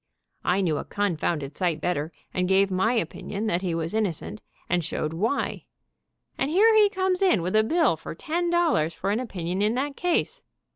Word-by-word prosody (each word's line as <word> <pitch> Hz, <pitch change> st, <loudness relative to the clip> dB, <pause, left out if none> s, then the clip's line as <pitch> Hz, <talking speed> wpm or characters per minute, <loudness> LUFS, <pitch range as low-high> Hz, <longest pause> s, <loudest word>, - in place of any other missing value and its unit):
I 185 Hz, +2 st, +2 dB
knew 160 Hz, -5 st, +1 dB
a -, -, -3 dB
confounded 165 Hz, -7 st, -2 dB
sight 175 Hz, -4 st, 0 dB
bet 180 Hz, +3 st, 0 dB
ter, 150 Hz, +3 st, -3 dB, 0.2 s
and 180 Hz, 0 st, 0 dB
gave 195 Hz, 0 st, +3 dB
my 190 Hz, +6 st, +2 dB
opinion 210 Hz, 0 st, -3 dB
that 180 Hz, -5 st, 0 dB
he 180 Hz, -3 st, -1 dB
was 165 Hz, +2 st, -2 dB
innocent, 210 Hz, -1 st, -2 dB, 0.3 s
and 175 Hz, -1 st, +1 dB
showed 155 Hz, 0 st, -2 dB
why, 220 Hz, +11 st, -1 dB, 0.7 s
and 270 Hz, -, +1 dB
here 430 Hz, +7 st, +5 dB
he 420 Hz, -1 st, +6 dB
comes 375 Hz, -1 st, 0 dB
in 360 Hz, -, +3 dB
with 185 Hz, +4 st, -1 dB
a 215 Hz, -, +5 dB
bill 325 Hz, +9 st, +2 dB
for -, -, -8 dB
ten 345 Hz, +2 st, -2 dB
dollars 325 Hz, -, +2 dB
for 200 Hz, -, -2 dB
an 215 Hz, -, +1 dB
opinion 185 Hz, -6 st, -3 dB
in 215 Hz, +3 st, +2 dB
that 275 Hz, +2 st, -2 dB
case. 355 Hz, -1 st, 0 dB
200 Hz, 195 wpm, -25 LUFS, 170-285 Hz, 0.7 s, he